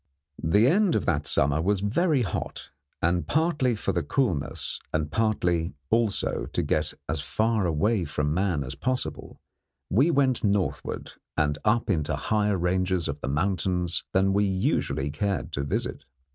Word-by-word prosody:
The 100 +8 +4
end 190 +5 +3
of - - 0
that 75 -3 0
summer 70 +3 +3
was 95 +2 +1
very 135 - +2
hot, 95 - -5 0.3
and 85 +1 +1
partly 150 -6 +1
for 105 - -1
the - - 0
coolness, 90 - -1
and 75 -1 -1
partly, 90 -6 0 0.2
also, 115 -3 +1
to - - 0
get 75 0 0
as 80 -1 -1
far 110 +7 +1
away 95 +5 +1
from 75 0 -1
man 90 -4 0
as 65 0 -6
possible, 125 - -3 0.5
we 130 - +4
went 135 -5 +2
northward 100 -3 -1 0.3
and 75 -1 +1
up 115 +2 +2
into 75 -4 0
higher 105 +6 +1
ranges 90 0 +1
of 70 +1 -4
the - - -3
mountains 90 +2 0
than 95 +1 +3
we 100 +1 +3
usually 95 -7 0
cared 100 +3 -2
to 70 -2 -2
visit. 70 - -3
95 Hz, 155 wpm, -26 LUFS, 75-110 Hz, 0.5 s, The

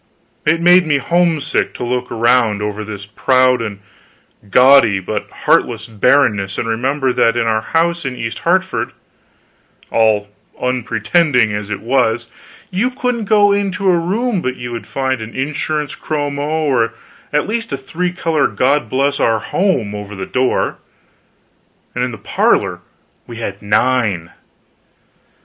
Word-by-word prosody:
It 165 +2 +3
made 175 0 +5
me 145 -2 +3
homesick 165 0 0
to - - -5
look 125 +1 -2
around 115 -3 +2
over 105 0 -3
this 100 -1 -7
proud 130 +3 +2
and 100 -3 -5 0.7
gaudy 125 -4 +6
but 105 +3 -4
heartless 115 -2 +1
barrenness 105 -4 +2
and 115 - -2
remember 130 +4 0
that 115 0 +2
in 120 - +1
our 110 -1 +1
house 170 +6 0
in 130 -3 -4
East 115 -2 -5
Hartford, 185 +2 0 1.0
all 110 -2 +2 0.3
unpretending 125 0 +1
as 105 0 -4
it 100 -1 -4
was, 115 -1 0 0.4
you 200 +7 +1
couldn't 250 -3 -2
go 205 -1 +4
into 195 -1 +1
a - - +3
room 200 +4 -1
but 130 -3 -2
you 120 0 -7
would 115 -1 -6
find 130 -3 -2
an 110 +1 -8
insurance 150 +1 -2
chromo, 150 +1 -2
or 115 -5 +1 0.4
at 150 0 0
least 230 -2 -3
a 135 - -1
three 175 +6 -3
color 165 -5 +1
God 140 +3 +1
Bless 140 +2 0
Our 115 -1 +2
Home 120 - -1
over 105 0 -7
the 95 -1 -5
door; 130 +4 0 1.1
and 125 - -1
in 125 - 0
the 115 - -7
parlor - - +1 0.5
we 120 - -9
had 100 -4 -5
nine. 105 -5 +1
130 Hz, 145 wpm, -17 LUFS, 110-160 Hz, 1.1 s, gaudy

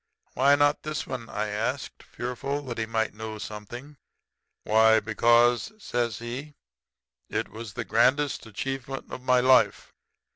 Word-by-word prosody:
"'Why 140 +3 +5
not 145 +1 +2
this 155 -1 -4
one?' 120 -4 -6
I 105 0 -2
asked, 115 +6 -3
fearful 135 +4 -4
that 120 -4 -5
he 110 - -1
might 110 -1 -1
know 110 0 -6
something. 120 +8 -8 0.7
"'Why, 110 +1 +5
because,' 120 - +3
says 120 - -2
he, 130 +6 -7 0.7
'it - - -2
was 110 -1 -8
the - - -4
grandest 130 +3 +2
achievement 135 +4 -5
of - - -6
my 125 -1 +3
life. 130 0 +3
120 Hz, 140 wpm, -27 LUFS, 110-135 Hz, 0.7 s, Why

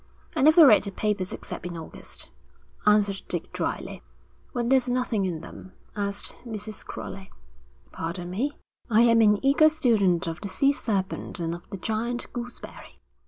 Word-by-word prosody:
'I - - +1
never 310 +3 +8
read 220 -7 +7
the 200 - -5
papers 200 -2 -1
except - - -7
in 175 -1 -5
August,' 160 - -9 0.6
answered 205 -2 +3
Dick - - -3
drily. - - -3 0.5
'When 240 -1 -2
there's 260 -1 +3
nothing 245 -5 0
in 165 -3 -4
them?' 185 - -11 0.2
asked 200 -1 -3
Mrs. 215 -3 -7
Crowley. 190 0 -8 0.6
'Pardon 175 +2 -4
me, 260 +10 -2 0.3
I 225 0 +5
am 230 -1 +5
an 210 -1 +5
eager 285 +3 +6
student 220 - +2
of 165 -1 -5
the 200 - -4
sea 275 +8 +2
serpent 195 -7 -2
and 165 -1 -2
of 170 0 -10
the 195 - -6
giant 225 +5 -3
gooseberry.' 245 0 -8
210 Hz, 160 wpm, -26 LUFS, 190-245 Hz, 0.6 s, never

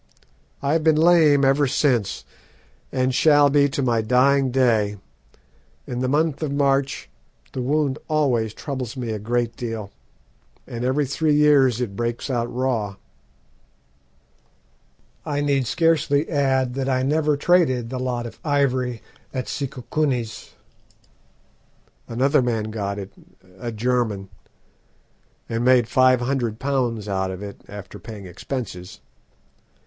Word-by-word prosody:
I 140 +2 +1
have 160 -1 +1
been 160 -1 +4
lame 155 -4 +5
ever 135 +1 +3
since, 125 -7 0 0.7
and 130 0 0
shall 145 0 +5
be 140 0 +4
to 140 0 -2
my 120 -3 +2
dying 130 +4 +3
day; 115 -5 +2 0.9
in 125 - -4
the 130 - 0
month 150 +2 +1
of 155 -3 -2
March 140 -1 0 0.5
the 130 - -3
wound 140 +1 0
always 125 -9 +1
troubles 130 -3 -5
me 120 -3 -3
a 110 - -3
great 120 +2 -1
deal, 115 -4 -5 0.7
and 120 0 -6
every 135 +3 +1
three 150 +3 +1
years 140 -5 +4
it 115 -6 -3
breaks 120 +4 -3
out 120 -1 -1
raw. 120 -6 -1 2.3
"I 145 -1 -2
need 140 -3 +1
scarcely 155 0 +2
add 130 -4 +1
that 135 0 -2
I 130 -1 +1
never 150 +1 +1
traded 130 -8 +2
the 130 - -3
lot 125 -2 -2
of 120 - -9
ivory 130 -5 0 0.3
at 130 -1 -4
Sikukuni's. 125 -4 -3 1.5
Another 135 +5 +2
man 110 -3 -1
got 100 -2 -3
it 100 -1 -7 0.5
a 120 - -4
German 110 -4 -1 1.2
and 115 +1 -2
made 125 -2 +4
five 130 0 +4
hundred 120 -4 -1
pounds 125 -6 -1
out 95 -1 -1
of 95 +1 -6
it 100 -1 -9
after 100 -1 -9
paying 105 -4 -9
expenses. 90 0 -6
130 Hz, 130 wpm, -22 LUFS, 115-140 Hz, 2.3 s, lame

